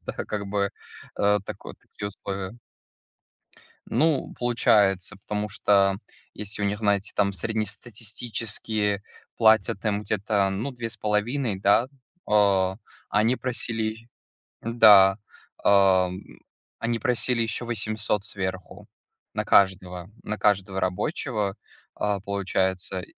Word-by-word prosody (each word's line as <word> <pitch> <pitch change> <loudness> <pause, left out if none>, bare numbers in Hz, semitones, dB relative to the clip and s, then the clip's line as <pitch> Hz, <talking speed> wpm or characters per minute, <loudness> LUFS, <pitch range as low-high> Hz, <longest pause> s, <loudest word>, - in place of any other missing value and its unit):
так - - -5
как 105 -1 -3
бы, 100 0 0 0.5
э, 105 0 +3
так, - - -8
вот - - -9
такие 100 - -7
условия. 100 +2 -6 1.3
Ну, 155 -3 +1
получается, 105 -5 +2
потому 105 +1 -4
что 100 -1 +2 0.3
если 105 0 -6
у - - +1
них 100 +1 -1
на 100 -2 +3
эти 100 +2 -7
там 100 -1 +1
среднестатистические 110 0 -3 0.3
платят 110 -3 +3
им 105 -1 0
где-то, 100 -1 0
ну, 105 +8 -3
2,5, 115 0 -1
да, 115 +5 +4 0.4
а, 100 -3 +3 0.3
они 110 +5 +3
просили 115 -2 -2 0.5
да, 105 -4 +7 0.5
ам, 95 -2 +4 0.6
они 115 0 -1
просили 125 +1 +1
ещё 115 +1 -2
800 110 -2 -2
сверху 95 -3 -6 0.5
на - - -1
каждого 95 -2 +2
на 105 0 -4
каждого 95 -2 +1
рабочего, 100 - -1 0.4
а, 105 -1 -1
получается 95 -2 -1
105 Hz, 110 wpm, -25 LUFS, 95-110 Hz, 1.3 s, да